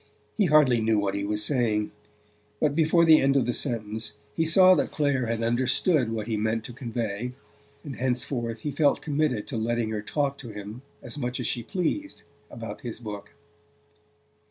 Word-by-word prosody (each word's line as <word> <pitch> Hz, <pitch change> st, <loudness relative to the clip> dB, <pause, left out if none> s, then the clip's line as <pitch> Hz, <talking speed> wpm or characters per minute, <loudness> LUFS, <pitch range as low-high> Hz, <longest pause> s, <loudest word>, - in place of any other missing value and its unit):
He 210 Hz, -, +3 dB
hardly 145 Hz, -7 st, +5 dB
knew 110 Hz, 0 st, +2 dB
what 100 Hz, -1 st, 0 dB
he 100 Hz, 0 st, -2 dB
was 105 Hz, +1 st, 0 dB
saying; 110 Hz, -6 st, +1 dB, 0.7 s
but 150 Hz, -2 st, +2 dB
before 165 Hz, +1 st, +4 dB
the 160 Hz, -1 st, +7 dB
end 135 Hz, 0 st, +3 dB
of 130 Hz, -, +2 dB
the 120 Hz, -, 0 dB
sentence 110 Hz, -4 st, -3 dB, 0.2 s
he 160 Hz, -, +1 dB
saw 185 Hz, +3 st, +7 dB
that -, -, +1 dB
Clare 140 Hz, -5 st, 0 dB
had 115 Hz, 0 st, -1 dB
understood 125 Hz, +3 st, +2 dB
what 110 Hz, -2 st, -3 dB
he 110 Hz, -1 st, -2 dB
meant 110 Hz, +1 st, -1 dB
to 120 Hz, -, -8 dB
convey, 115 Hz, -1 st, -4 dB, 0.5 s
and 140 Hz, -4 st, -7 dB
henceforth 120 Hz, -2 st, -1 dB
he 150 Hz, -, -3 dB
felt 145 Hz, 0 st, +2 dB
committed 145 Hz, -7 st, 0 dB
to 130 Hz, -, -4 dB
letting 115 Hz, 0 st, -1 dB
her 105 Hz, -1 st, -2 dB
talk 140 Hz, +5 st, -1 dB
to 120 Hz, -, -8 dB
him 105 Hz, +3 st, -8 dB, 0.2 s
as 150 Hz, -, -6 dB
much 125 Hz, -1 st, -3 dB
as -, -, -3 dB
she 120 Hz, -, -1 dB
pleased 190 Hz, -, -3 dB, 0.3 s
about 115 Hz, 0 st, -8 dB
his 120 Hz, -5 st, -6 dB
book. 105 Hz, -3 st, -8 dB
120 Hz, 180 wpm, -26 LUFS, 110-145 Hz, 0.7 s, the